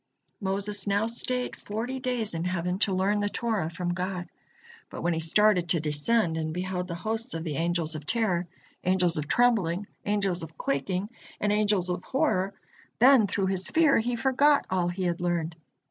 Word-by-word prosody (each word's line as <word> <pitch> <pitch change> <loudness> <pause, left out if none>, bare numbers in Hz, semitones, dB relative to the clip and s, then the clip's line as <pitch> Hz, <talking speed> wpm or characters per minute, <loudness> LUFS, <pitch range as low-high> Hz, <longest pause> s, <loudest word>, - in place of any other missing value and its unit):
Moses 200 +1 -1
now 200 +2 +2
stayed 250 +2 -2
forty 235 +5 -4
days 250 -5 -2
in 165 0 -3
heaven 180 0 -1
to 205 - +2
learn 195 +3 +1
the 205 0 0
Torah 215 -8 -1
from 175 +1 -3
God. 180 0 -3 0.6
But - - -7
when 175 0 +1
he 160 - -1
started 180 +1 +3
to 170 - +2
descend 160 +5 +1
and 160 0 -3
beheld 180 0 -3
the 170 - -4
hosts 220 +4 -3
of 165 - -4
the 155 -4 -3
angels 170 -1 +1
of 150 -1 -7
terror, 185 -7 0 0.4
angels 180 -3 +3
of 150 - -4
trembling, 205 -6 +2 0.2
angels 200 -3 0
of 160 -1 -8
quaking, 180 +9 -2 0.3
and 210 - +1
angels 205 -3 +2
of 180 0 -2
horror, 200 -9 0 0.4
then 250 -3 +6
through 195 0 -1
his 190 0 +1
fear 315 -6 +4
he 240 +2 -1
forgot 275 +4 +3
all 180 -2 +1
he 180 +2 -3
had 175 0 -1
learned. 170 -2 -1
190 Hz, 180 wpm, -27 LUFS, 175-215 Hz, 0.6 s, then